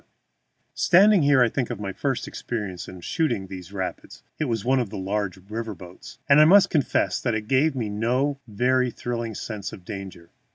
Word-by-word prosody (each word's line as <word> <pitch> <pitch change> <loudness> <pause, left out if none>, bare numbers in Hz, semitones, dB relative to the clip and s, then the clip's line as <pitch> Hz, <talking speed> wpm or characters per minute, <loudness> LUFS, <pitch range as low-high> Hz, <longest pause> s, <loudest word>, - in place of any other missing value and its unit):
] - - -48 0.2
Standing 195 +3 +6
here, 140 -3 +5
I - - +4
think 125 +1 -2
of 120 -4 -5
my 100 -2 -4
first 135 +2 -2
experience 105 -7 -5
in 90 -1 -10
shooting 120 - -1
these 95 -1 -9
rapids 95 -2 -6 0.2
(it 155 - 0
was 115 -5 -2
on 125 - -2
one 135 0 +4
of 120 -5 -2
the 105 - -7
large 95 0 -2
river 115 -1 -4
boats), 90 +7 -12
and 140 +1 +7
I - - +8
must 195 +4 +6
confess 150 -5 +1
that 120 -4 0
it 105 -1 -4
gave 135 +4 +2
me 120 -4 -2
no 125 +7 0
very 125 +4 +1
thrilling 115 -2 -4
sense 105 -2 -5
of 90 - -12
danger. 95 -4 -8
115 Hz, 205 wpm, -24 LUFS, 100-135 Hz, 0.2 s, I